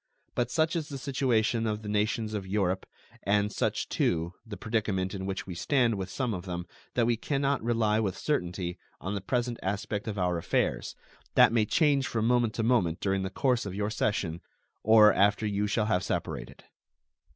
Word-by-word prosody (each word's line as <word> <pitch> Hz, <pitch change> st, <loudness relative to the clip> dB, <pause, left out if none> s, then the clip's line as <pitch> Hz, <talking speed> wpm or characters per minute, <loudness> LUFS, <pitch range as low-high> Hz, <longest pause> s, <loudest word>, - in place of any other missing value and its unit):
But 120 Hz, -, 0 dB
such 160 Hz, +1 st, +1 dB
is 160 Hz, -3 st, -2 dB
the 140 Hz, -, -5 dB
situation 120 Hz, -4 st, +1 dB
of 105 Hz, 0 st, -2 dB
the -, -, -7 dB
nations 105 Hz, +1 st, 0 dB
of 100 Hz, -3 st, -3 dB
Europe 95 Hz, -2 st, 0 dB, 0.3 s
and 105 Hz, +1 st, +1 dB
such, -, -, -1 dB
too, 85 Hz, +1 st, 0 dB
the 110 Hz, -3 st, -8 dB
predicament 100 Hz, -3 st, -1 dB
in 95 Hz, -1 st, -4 dB
which 95 Hz, -1 st, -3 dB
we 95 Hz, -, -6 dB
stand 120 Hz, -, +2 dB
with 95 Hz, -2 st, -4 dB
some 125 Hz, +2 st, -2 dB
of 90 Hz, -1 st, -5 dB
them 90 Hz, -1 st, -4 dB, 0.3 s
that 120 Hz, -, +3 dB
we 120 Hz, 0 st, +2 dB
can 135 Hz, +5 st, -2 dB
not 140 Hz, -1 st, +1 dB
rely 115 Hz, -2 st, +2 dB
with 100 Hz, -4 st, -1 dB
certainty 90 Hz, -, -2 dB, 0.2 s
on 95 Hz, +3 st, -4 dB
the 100 Hz, -, -2 dB
present 120 Hz, +3 st, -1 dB
aspect 100 Hz, +2 st, -3 dB
of 105 Hz, -1 st, -3 dB
our 90 Hz, -2 st, +1 dB
affairs, -, -, -1 dB, 0.4 s
that -, -, +7 dB
may 110 Hz, -2 st, +3 dB
change 140 Hz, 0 st, +2 dB
from 110 Hz, -1 st, -1 dB
moment 120 Hz, -2 st, +2 dB
to 115 Hz, -, -1 dB
moment 100 Hz, -9 st, +2 dB
during 95 Hz, -1 st, 0 dB
the 95 Hz, -, -2 dB
course 125 Hz, +4 st, +1 dB
of 95 Hz, -, -5 dB
your 105 Hz, +1 st, -1 dB
session 95 Hz, -5 st, -1 dB, 0.4 s
or 110 Hz, -1 st, +7 dB
after 105 Hz, +2 st, +3 dB
you 105 Hz, 0 st, 0 dB
shall 110 Hz, +1 st, +1 dB
have 95 Hz, -4 st, +1 dB
separated. -, -, -4 dB
105 Hz, 195 wpm, -29 LUFS, 95-120 Hz, 0.4 s, that